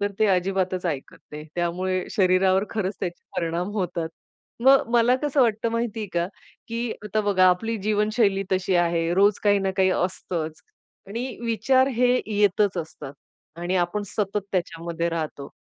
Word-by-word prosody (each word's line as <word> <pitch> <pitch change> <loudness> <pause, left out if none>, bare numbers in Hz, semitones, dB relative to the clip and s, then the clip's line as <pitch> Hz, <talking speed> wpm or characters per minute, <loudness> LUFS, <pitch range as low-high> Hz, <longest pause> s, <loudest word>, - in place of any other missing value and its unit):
तर 205 0 0
ते 215 - +4
अजिबातच 185 -1 0
ऐकत 145 -5 -4
नाही. 150 0 -7
त्यामुळे 180 +2 -1
शरीरावर 190 +1 +3
खरंच 200 -3 -2
त्याचे 175 -2 -4
परिणाम 170 +3 -1
होतात. 175 -5 -2 0.5
मग 270 0 +5
मला 240 +2 +5
कसं 290 -1 +1
वाटतं 225 0 +1
माहितीये 230 -2 -2
का? 170 0 0 0.4
की 230 0 -2
आता 215 +1 0
बघा 195 -3 +3
आपली 225 +6 0
जीवनशैली 210 0 +1
तशी 185 0 +1
आहे. 170 -1 +1
रोज 200 +1 +4
काही 205 -1 +5
ना 195 0 0
काही 190 -1 +4
असतंच. 170 -3 -2 0.5
आणि 235 +5 -5
विचार 260 +4 +3
हे 250 0 +4
येतच 205 -2 +2
असतात 155 -4 -7 0.5
आणि 180 +2 -1
आपण 180 +4 0
सतत 205 +1 -2
त्याच्यामध्ये 170 -1 -2
राहतो. 155 -4 -4
190 Hz, 150 wpm, -24 LUFS, 175-215 Hz, 0.5 s, मग